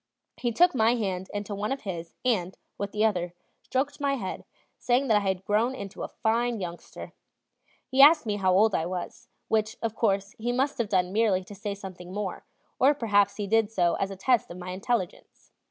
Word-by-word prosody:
He 240 - -1
took 355 +10 +4
my 230 -1 +3
hand 190 -5 -3
into 205 0 -4
one 205 +3 -3
of 270 - -2
his, 170 -5 -6
and, 190 -7 0 0.2
with 200 0 -3
the 215 +1 +1
other, 180 -5 -1 0.3
stroked 280 +2 -2
my 280 -1 +1
head, 195 -8 -5 0.3
saying 255 +2 +1
that 215 - +5
I 200 -1 -1
had 190 0 -3
grown 225 +5 +1
into 200 -3 -8
a - - -3
fine 230 +1 0
youngster. 175 -2 -8 0.7
He 260 +1 +3
asked 300 0 +8
me 210 -2 -1
how 190 -2 +2
old 205 +3 +4
I 160 - 0
was; 180 -1 -6 0.2
which, 220 0 0
of 230 -2 -2
course, 200 -2 0
he 240 +2 -1
must 265 +3 0
have 225 -3 0
done 185 -2 +1
merely 205 -4 +2
to 200 - -11
say 200 0 -4
something 185 -3 -9
more, 200 -1 -4 0.4
or 280 +3 +5
perhaps 205 -6 +2
he 205 - -3
did 220 +1 +2
so 175 -5 +2
as 195 - -1
a 195 - -6
test 235 +4 +1
of 175 - -8
my 180 0 -6
intelligence. 190 +1 -4
205 Hz, 205 wpm, -27 LUFS, 190-235 Hz, 0.7 s, asked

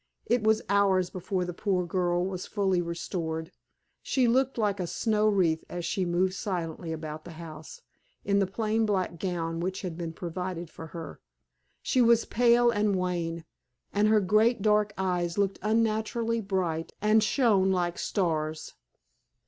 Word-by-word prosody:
It 240 0 +2
was 220 +1 +2
hours 195 -3 +2
before 185 0 -2
the 180 - -5
poor 185 0 0
girl 175 0 0
was 185 -1 -4
fully 190 -4 +1
restored. 170 -1 -4 0.5
She 255 -3 +1
looked 260 +2 +2
like 205 -3 0
a 180 - -2
snow 215 +3 +1
wreath 180 -6 +2
as 175 -1 -4
she 190 -3 -1
moved 180 +2 +1
silently 175 -4 -4
about 155 -1 -6
the 175 - -10
house, 170 - -10 0.4
in 200 0 +2
the 195 - +2
plain 220 +2 0
black 185 -4 -1
gown 165 -3 -2
which 185 +3 -3
had 180 -3 -4
been 165 -1 -3
provided 175 0 -5
for 160 - -9
her. 165 +1 -8 0.6
She 255 - +2
was 235 -1 +5
pale 240 0 +4
and 205 -2 +1
wan, 170 -3 -2 0.5
and 205 +1 +3
her 215 0 +4
great 215 +3 +3
dark 210 -1 +3
eyes 180 -2 -1
looked 195 -1 0
unnaturally 225 +1 0
bright, 180 -5 -2
and 215 +1 +4
shone 215 -6 +3
like 175 -2 0
stars. 155 -5 -2
190 Hz, 155 wpm, -28 LUFS, 175-215 Hz, 0.6 s, was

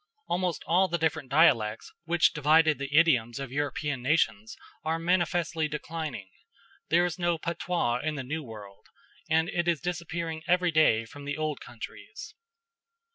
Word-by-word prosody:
Almost 180 -1 -1
all 185 +3 +3
the 170 - -1
different 160 -4 -1
dialects 125 -8 +3
which 170 0 +3
divided 155 0 +4
the 140 0 -5
idioms 125 -8 +3
of 135 -3 -6
European 145 -1 -2
nations 115 -6 0 0.3
are 160 +1 0
manifestly 170 -2 0
declining; 150 -8 -5 0.6
there 175 +2 +4
is 180 0 -4
no 175 -1 +1
patois 170 -7 -1
in 155 +3 -2
the 140 - -4
New 155 +5 -4
World, 105 -5 -12 0.4
and 160 +1 +3
it 175 -1 -1
is 170 -3 +2
disappearing 170 -1 -4
every 180 -1 +3
day 135 -8 +3
from 140 +5 -11
the 145 +1 -3
old 155 -2 -2
countries. 350 - -10
160 Hz, 150 wpm, -28 LUFS, 135-170 Hz, 0.6 s, divided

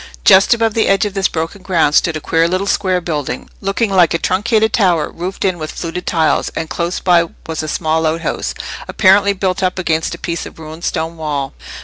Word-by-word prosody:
Just 195 +5 +6
above 225 -1 0
the 225 - +1
edge 195 +1 +3
of 205 - -3
this 195 -2 +1
broken 165 +5 -4
ground 170 -6 +1
stood 165 0 +3
a - - -5
queer 165 +2 +1
little 185 +3 -1
square 185 -2 +1
building, 150 -6 -4
looking 195 +2 0
like 175 -4 +4
a - - +3
truncated 220 +5 +1
tower 180 -7 +2
roofed 185 +4 -4
in 185 -3 0
with 155 0 -5
fluted 175 +1 -5
tiles, 160 -2 +1
and 160 - -4
close 170 +1 -2
by 175 -2 +3 0.2
was 160 -1 -3
a 155 - -5
small 160 +1 0
outhouse, 160 +2 -2 0.3
apparently 200 +1 +4
built 190 -1 -1
up 185 0 0
against 165 -3 -1
a - - -12
piece 170 -1 -4
of - - -14
ruined 160 +1 -8
stone 165 0 -2
wall. 145 -4 -3
175 Hz, 210 wpm, -16 LUFS, 160-195 Hz, 0.3 s, Just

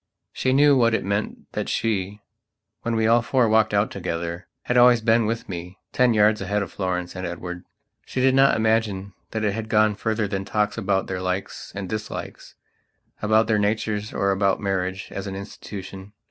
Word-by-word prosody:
She 130 - 0
knew 145 +2 +5
what 115 -3 +4
it 115 - -2
meant 100 +2 -2
that - - -3
she, 105 -2 -1 0.6
when 115 -1 -1
we 110 0 +2
all 115 +2 +5
four 120 +1 +2
walked 110 0 +3
out 105 +1 +1
together, 85 -1 -4 0.2
had 125 - -1
always 120 -1 +7
been 115 0 +3
with 115 +2 -3
me 90 0 -7 0.2
ten 125 -2 +3
yards 105 0 +4
ahead 100 +2 0
of 95 - -8
Florence 90 -2 -3
and 90 - -5
Edward. 90 0 -5 0.4
She - - -5
did 130 +1 +4
not 135 +1 +5
imagine 110 -3 0 0.2
that 110 -1 -3
it 105 -2 +1
had 110 0 -5
gone 110 0 +4
further 110 0 -1
than 95 -1 -3
talks 105 +1 0
about 95 -3 0
their 95 -1 -4
likes 95 +2 -4
and 100 -1 -4
dislikes, 110 +2 -6 0.7
about 110 +1 +3
their 110 -2 +2
natures 105 0 -1
or 100 0 +1
about 95 0 +1
marriage 95 -2 -2
as 100 +1 -5
an 95 - -5
institution. 100 0 -8
105 Hz, 190 wpm, -24 LUFS, 95-110 Hz, 0.7 s, always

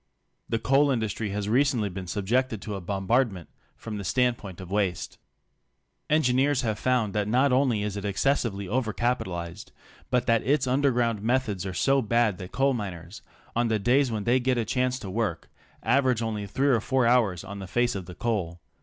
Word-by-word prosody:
The 115 - +1
coal 135 +5 +3
industry 110 -4 -1
has 100 +1 -3
recently 125 -1 +2
been 95 -1 -6
subjected 110 +5 0
to 105 - -5
a 100 - -5
bom 95 +2 -4
bardment 115 -8 +1 0.3
from 110 -2 -6
the - - -5
standpoint 120 -4 -1
of 95 -1 -9
waste. 100 -4 -1 0.9
Engineers 140 -2 +3
have 110 -3 -1
found 125 -5 +1
that 105 -1 0
not 130 +5 +3
only 125 -5 +2
is 105 -1 -3
it 100 - -5
excessively 100 -1 0
over 115 0 -1
capitalized, 95 -7 -3 0.4
but 125 -1 +1
that 115 -1 +3
its 140 0 +1
underground 125 -5 +1
methods 110 -5 0
are 95 - -5
so 135 0 +3
bad 110 -3 +1
that 90 -1 -8
coal 135 +1 +2
miners 95 -4 -6 0.2
— - - -29
on 120 0 +2
the 110 -1 +1
days 125 +6 +2
when 110 -3 -3
they 120 +3 +3
get 125 0 +1
a 115 - 0
chance 130 +1 0
to 100 - -7
work 95 -7 -2 0.2
— - - -31
average 125 -1 +2
only 105 -2 -3
three 135 +8 +1
or 120 -5 +3
four 130 +1 +1
hours 115 -8 +2
on 100 0 -8
the 95 - -7
face 120 +5 +1
of 95 -3 -6
the 90 - -9
coal. 95 -8 -2
115 Hz, 200 wpm, -26 LUFS, 100-125 Hz, 0.9 s, coal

